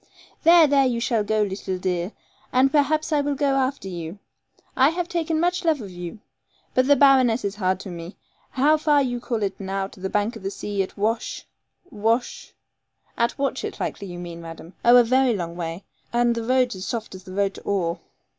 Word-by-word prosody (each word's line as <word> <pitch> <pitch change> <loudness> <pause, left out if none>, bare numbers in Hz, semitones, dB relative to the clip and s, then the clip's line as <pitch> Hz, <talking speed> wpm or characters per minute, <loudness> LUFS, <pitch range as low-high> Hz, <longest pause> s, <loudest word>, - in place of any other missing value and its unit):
'There, 335 0 +7
there, 280 -2 +4
you 240 -2 -1
shall 235 -2 +1
go, 215 +1 +1
leetle 190 -1 -3
dear, 180 0 -2 0.4
and 260 +2 +4
perhaps 310 +1 +2
I 295 - +3
will 285 0 -1
go 280 0 +1
after 265 -5 -1
you. 170 0 -6 0.6
I 265 +2 +5
have 345 +1 -2
taken 330 -2 -1
much 355 +2 +1
love 320 -3 +2
of 200 -5 -8
you. 175 +3 -7 0.6
But 255 0 +3
the 285 - +6
baroness 255 -5 +4
is 200 0 -3
hard 185 -2 0
to - - -8
me. 170 +1 -8 0.3
How 295 +4 +3
far 295 -2 +3
you 245 -2 -2
call 235 -3 -2
it 195 -1 -3
now 195 0 -2
to - - -16
the 190 +1 -3
bank 210 +4 0
of 225 - -9
the 195 - -3
sea 200 0 -3
at 190 - -5
Wash 225 +3 -2 0.5
Wash 225 +3 -1 0.4
' - - -42
'At 235 0 +1
Watchett, 275 -1 -2
likely 200 - -4
you 175 -1 -7
mean, 170 -1 -7
madam. 165 +1 -10
Oh, 240 +1 +7
a 245 - +7
very 255 0 +3
long 170 -3 -4
way, 170 +2 -5 0.3
and 240 0 +2
the 230 -1 -3
roads 250 0 +2
as 185 +1 -6
soft 230 -3 -4
as 185 -1 -10
the 185 -1 -10
road 200 -1 +1
to - - -11
Oare.' 175 -4 -1
230 Hz, 210 wpm, -23 LUFS, 190-270 Hz, 0.6 s, There